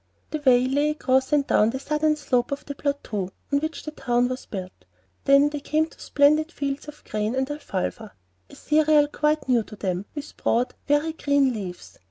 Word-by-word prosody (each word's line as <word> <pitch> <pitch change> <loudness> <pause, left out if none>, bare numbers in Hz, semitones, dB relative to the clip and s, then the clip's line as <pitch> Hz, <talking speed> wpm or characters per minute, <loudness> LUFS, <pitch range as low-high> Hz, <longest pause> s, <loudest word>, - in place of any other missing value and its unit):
The 310 - -2
way 250 -2 +5
lay 285 +3 +1
across 265 -3 +1
and 290 -2 +3
down 215 -4 +3
the 260 +3 -3
southern 305 +2 +1
slope 250 -5 0
of 280 - -4
the 285 - -5
plateau 275 -10 -3 0.2
on 280 - +4
which 315 +2 -4
the 305 - -5
town 245 -4 0
was 255 +1 -5
built. 185 -3 -5 0.5
Then 280 +1 +6
they 295 0 -4
came 310 +2 +1
to 325 - -18
splendid 305 +3 +3
fields 280 -2 -4
of 300 0 -11
grain 215 +3 -2
and 265 0 0
"afalfa," 220 -7 -4 0.4
a - - -13
cereal 305 -1 +3
quite 300 0 0
new 245 -3 +3
to 215 - -10
them, 190 -2 -3
with 290 0 -7
broad, 240 +2 +1
very 295 +2 +2
green 285 -4 +2
leaves. 185 -5 -7
280 Hz, 195 wpm, -24 LUFS, 245-300 Hz, 0.5 s, Then